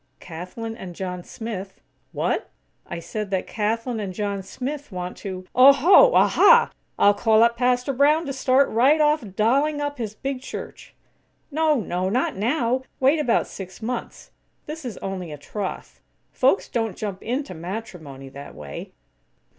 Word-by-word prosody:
"Kathlyn 185 +7 -7
and 185 -6 -9
John 180 -1 -5
Smith, 200 -4 -7 0.2
" - - -44
"What?" - - -1 0.4
"I - - -5
said 210 +5 -5
that 190 -1 -1
Kathlyn 225 +2 -2
and 195 -3 -5
John 200 -2 -2
Smith 270 +8 -6
want 180 -1 -5
to 185 -2 -6
" - - -45
"Oho! 365 - +6
Aha!! 475 -1 +6 0.3
I'll 205 - +5
call 220 +2 +4
up 235 0 +3
Pastor 250 +2 +1
Brown 295 +5 +3
to 275 - -3
start 265 +1 +3
right 265 +8 +4
off 300 -1 +3
dolling 280 +8 +2
up 290 -2 -3
his 215 -2 -4
big 270 +2 -4
church!" - - -8 0.6
"No, 310 +1 +2
no! 185 -1 -2
Not 250 +6 0
now! 240 +4 0 0.2
Wait 275 +4 +4
about 245 -6 +2
six 185 -1 -9
months. 235 +2 -5 0.3
This 305 -1 -7
is 235 -5 -5
only 185 -4 -4
a 150 - -7
troth. 190 +7 -6 0.3
Folks - - +2
don't 225 -6 -2
jump 200 -3 -5
into 250 -3 -3
matrimony, 165 - -7
that 140 +1 -10
way." 75 -1 -8
225 Hz, 160 wpm, -23 LUFS, 190-270 Hz, 0.6 s, Oho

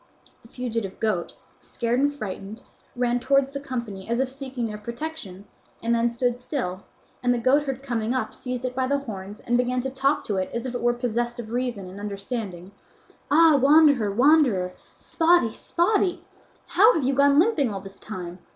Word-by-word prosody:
The - - -17
fugitive 230 -5 -4
goat, 210 -6 -1 0.2
scared 240 0 -2
and 285 +1 +3
frightened, 215 -4 -7 0.3
ran 245 0 +1
towards 275 +1 +2
the 280 - -4
company 235 -8 -6
as 235 +1 0
if 265 -1 +1
seeking 265 -2 -5
their 210 -1 -5
protection 235 -4 -6 0.4
and 230 +1 +1
then 235 0 +2
stood 245 +1 -1
still, 240 - -3 0.4
and 245 - +2
the 245 - +2
goatherd 270 +2 +1
coming 235 -4 -2
up 255 0 -2
seized 250 -1 -5
it 255 - -2
by 260 0 0
the 280 +1 +2
horns 210 -6 -7
and 240 0 +1
began 250 0 0
to 265 +1 -4
talk 270 +2 +1
to 205 - -2
it 185 - -1
as 235 +1 -3
if 255 - -4
it 245 - -3
were 240 0 +2
possessed 240 0 -2
of 225 -2 -7
reason 240 -6 -2
and 190 +2 -9
understanding: 200 -2 -5 0.6
"Ah 310 -1 +6
wanderer, 285 -6 +5
wanderer, 240 -6 +4 0.3
Spotty, 330 -7 +2
Spotty; 360 - 0 0.4
how 430 +6 +5
have 315 - 0
you 270 +2 +1
gone 280 +1 +4
limping 315 - +3
all 195 - -4
this 195 0 -12
time? 180 -4 -7
245 Hz, 185 wpm, -25 LUFS, 215-275 Hz, 0.6 s, Ah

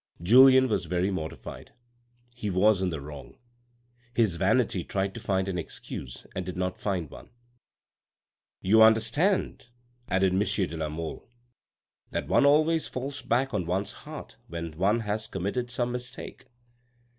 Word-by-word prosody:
Julien 130 +6 +7
was 105 -6 -1
very 90 +3 0
mortified; 80 -4 -7 0.6
he 120 -4 -4
was 95 +1 +3
in 95 - +1
the 80 -3 -4
wrong. 70 0 -10 0.8
His 110 -7 +3
vanity 100 0 +1
tried 95 +1 -2
to - - -7
find 95 -3 0
an 90 -2 -2
excuse 65 -5 -7
and 95 - -3
did 90 0 -6
not 90 0 -2
find 95 -6 -2
one. - - -13 0.7
" - - -67
You 110 +2 +7
understand," 115 - +3 0.4
added 95 0 +2
monsieur 100 0 +1
de 85 - -7
la 80 -1 -3
Mole, 80 +7 -6 0.4
" - - -51
that - - -2
one 140 - +4
always 155 +2 +3
falls 135 +3 -5
back 130 +3 0
on 90 -5 -1
one's 95 +3 -1
heart - - -10
when 85 -2 -6
one 100 +7 +2
has 110 0 -2
committed 115 +6 -3
some 120 0 -1
mistake." 125 +2 -7
100 Hz, 155 wpm, -27 LUFS, 90-120 Hz, 0.8 s, Julien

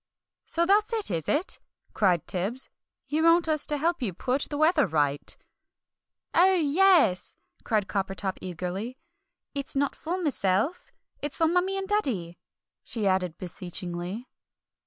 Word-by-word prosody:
"So 340 +1 +1
that's 420 +5 +3
it, 435 - 0
is 165 -3 -2
it?" 315 +6 +1 0.3
cried 180 -6 +2
Tibbs; 200 +8 -2 0.4
"you 305 +2 0
want 330 +1 +5
us 310 -2 +2
to 295 - +2
help 330 +2 0
you 210 -7 -1
put 260 +6 -1
the 290 - -3
weather 310 -1 +4
right?" 145 -2 0 1.0
"Oh, 375 +3 +5
yes!" 325 - +3 0.3
cried 215 -4 0
Coppertop 195 -1 -2
eagerly. 185 +7 -4 0.6
"It's 280 0 -2
not 280 0 +1
for 350 +4 -3
myself, 255 - 0 0.3
it's 290 0 -3
for 325 - +3
Mummie 360 +3 +1
and 385 0 -3
Daddy!" 225 - -1 0.4
she 220 -3 -3
added 185 -3 +1
beseechingly. 180 +4 -5
260 Hz, 135 wpm, -27 LUFS, -, 1.0 s, want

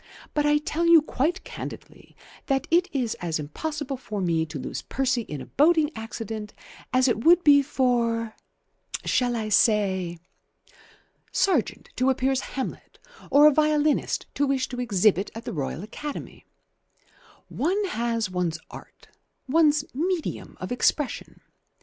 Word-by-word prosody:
But 295 -1 +1
I 295 0 +4
tell 320 +3 -1
you 335 -3 +7
quite 320 +6 -1
candidly - - -9 0.3
that 270 -1 +1
it 350 +2 +4
is 250 -6 -1
as 170 -2 -1
impossible 275 - -4
for 215 -5 -6
me 165 -3 0
to 150 0 -6
lose - - -5
Percy 260 -2 -1
in 150 -10 -7
a - - -8
boating 310 +1 +3
accident 220 -1 -6 0.4
as 255 0 +3
it 225 -2 0
would 350 +1 +6
be 285 -1 +7
for 235 -5 0 0.7
shall 245 -1 +1
I 220 -2 -3
say? 190 -5 +2 1.1
Sargent 345 - 0
to 255 +1 +3
appear 265 0 +1
as 265 - +1 0.2
'Hamlet' 265 - -5 0.3
or 290 +1 +6
a 300 - +7
violinist 305 0 +1
to 285 - +1
wish 270 -1 0
to 245 - -6
exhibit 205 -3 +2
at 230 +2 -8
the 240 - -4
Royal 150 +2 -4
Academy. 290 +7 -8 1.0
One 385 +8 0
has 230 - -1
one's 180 -3 -2
art, - - -13 0.4
one's 300 0 +3
medium 340 +4 -3
of - - -6
expression. 260 +3 -1
255 Hz, 145 wpm, -25 LUFS, 215-295 Hz, 1.1 s, you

